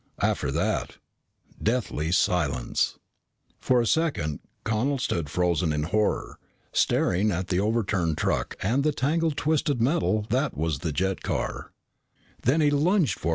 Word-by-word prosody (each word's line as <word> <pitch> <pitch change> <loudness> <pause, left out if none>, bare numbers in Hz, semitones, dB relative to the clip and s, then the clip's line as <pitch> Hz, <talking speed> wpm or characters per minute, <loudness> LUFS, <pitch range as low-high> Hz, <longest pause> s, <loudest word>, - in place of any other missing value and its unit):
After - - +1
that, - - -1 0.6
deathly 110 -9 -1
silence. 85 -8 +1 0.6
For 125 -1 +2
a - - 0
second 115 - 0 0.2
Connel 115 +6 0
stood 85 - -2
frozen 85 -1 +1
in 75 0 -1
horror, 105 +6 -1 0.3
staring 100 +5 +2
at 95 -1 -2
the 90 - +1
overturned 100 -6 0
truck - - -1
and 125 +8 +1
the 155 0 +2
tangle 160 +5 +1
of 155 - -1
twisted 150 -3 +1
metal 115 -5 +1
that 130 - 0
was 80 -2 -1
the 80 +1 -2
jet 95 +5 -1
car. - - -3
105 Hz, 125 wpm, -26 LUFS, 85-130 Hz, 0.6 s, For